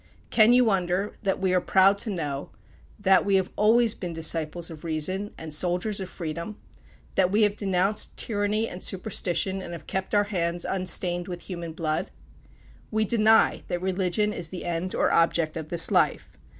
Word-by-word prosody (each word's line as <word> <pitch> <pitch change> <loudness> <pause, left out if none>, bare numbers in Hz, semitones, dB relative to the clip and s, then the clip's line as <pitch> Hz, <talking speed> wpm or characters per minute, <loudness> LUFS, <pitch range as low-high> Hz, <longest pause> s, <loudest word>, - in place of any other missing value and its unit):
Can 220 0 +5
you 250 0 +5
wonder 190 -1 0
that 195 -2 0
we 190 -1 0
are 180 - +3
proud 195 +2 +4
to 220 - -2
know, 145 -7 -4 0.5
that 195 -2 +4
we 200 -1 +1
have 190 -1 +1
always 225 +2 +4
been 180 -6 -6
disciples 165 +1 -2
of 155 -2 -11
Reason, 170 +6 -2
and 160 -1 -7
soldiers 180 +6 -1
of 190 -1 -6
Freedom; 170 +5 -6 0.6
that 185 -2 +2
we 215 +2 +3
have 205 -1 +2
denounced 195 0 0
tyranny 210 +1 0
and 180 - -8
superstition, 190 -1 -1
and 175 - -8
have 160 -3 -9
kept 190 +2 -3
our 205 - +4
hands 170 -1 -1
unstained 180 -1 +1
with 175 -2 -6
human 170 -3 -6
blood? 155 -1 -2 0.8
We 220 0 0
deny 220 +1 +3
that 175 0 -3
religion 190 +2 0
is 170 -4 -3
the 185 - -7
end 175 +2 -3
or - - +1
object 165 -1 +2
of 160 -2 -6
this 170 -1 +4
life. - - +1
185 Hz, 175 wpm, -25 LUFS, 170-205 Hz, 0.8 s, Can